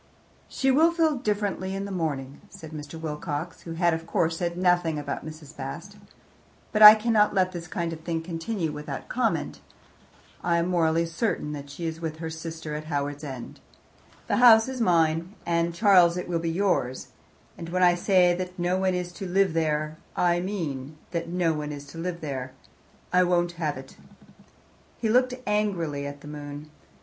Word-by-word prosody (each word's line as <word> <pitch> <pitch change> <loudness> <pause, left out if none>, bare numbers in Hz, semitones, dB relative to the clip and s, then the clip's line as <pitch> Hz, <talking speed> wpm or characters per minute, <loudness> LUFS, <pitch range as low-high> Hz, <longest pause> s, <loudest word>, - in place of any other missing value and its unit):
"She 270 0 +1
will 320 +5 +5
feel 325 -3 +2
differently 205 -4 -2
in 195 0 -3
the 200 - -6
morning," 145 -6 -3
said 160 -1 -11
Mr. 150 +1 -8
Wilcox, 150 +1 -4
who 165 - -7
had 170 0 +2
of 165 0 -4
course 165 -1 +1
said 170 0 -2
nothing 175 -3 +2
about 145 - -4
Mrs. 155 -1 -10
Bast. 165 +9 -7 0.7
"But 215 - 0
I 210 0 +13
cannot 215 -2 +2
let 185 -1 +2
this 175 -1 -7
kind 170 0 -3
of 160 - -7
thing 165 -1 -3
continue 165 0 -3
without 150 -2 -7
comment. 245 -2 -1 0.8
I 170 -1 +2
am 170 +1 0
morally 165 -2 +2
certain 165 -3 -2
that 145 -1 -7
she 165 +4 -6
is 165 0 -4
with 160 -1 -4
her 160 0 -5
sister 160 -1 -6
at 150 +1 -5
Howards 145 -1 -3
End. 130 -5 -7 0.7
The - - 0
house 225 -2 +7
is 260 -2 -4
mine 170 -1 +2
and, 170 0 +1
Charles, 180 -2 +5
it 180 - -4
will 170 -2 -1
be 165 0 -2
yours 165 -8 0 0.5
and 165 - -8
when 185 +1 +1
I 175 -1 +6
say 180 0 +4
that 180 +1 -5
no 180 +1 0
one 190 -1 +1
is 180 -1 -3
to 190 +2 -7
live 190 -1 +2
there, 155 -1 -1 0.2
I 175 -1 +2
mean 155 -7 -4
that 170 -1 -3
no 175 -2 +1
one 150 -1 -4
is 145 -1 -7
to 165 - -9
live 170 0 -4
there. 130 -4 -5 0.6
I 180 - +6
won't 175 -1 +2
have 150 -2 -1
it." - - -12 1.0
He 225 - -1
looked 250 +2 +3
angrily 175 -9 -1
at 145 0 -8
the 150 - -11
moon. 145 0 -8
170 Hz, 185 wpm, -26 LUFS, 155-185 Hz, 1.0 s, I